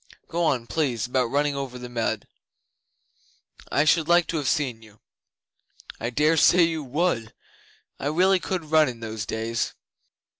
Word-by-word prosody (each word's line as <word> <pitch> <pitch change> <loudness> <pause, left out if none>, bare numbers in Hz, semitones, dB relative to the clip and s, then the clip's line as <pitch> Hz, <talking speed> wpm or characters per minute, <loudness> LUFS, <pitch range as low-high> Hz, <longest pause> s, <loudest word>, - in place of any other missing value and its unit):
Go 170 +1 -1
on, 130 -6 +1
please, 125 -6 -1
about 125 -1 0
running 145 +1 +1
over 135 -2 -5
the 125 0 -7
mud. 120 -2 -2 1.4
I 145 - +3
should 160 0 +3
like 175 0 +4
to 165 - -1
have 145 -3 -2
seen 125 -6 0
you.' 110 -1 -18 1.0
'I 115 - -2
dare 150 +6 +2
say 175 +3 +6
you 165 -2 0
would, 145 0 0
and 110 - -19 0.7
I 140 - -3
really 185 +5 +3
could 175 -4 -4
run 155 -3 +5
in 120 -2 -9
those 110 -1 -5
days. 115 0 -2
140 Hz, 160 wpm, -25 LUFS, 115-160 Hz, 1.4 s, say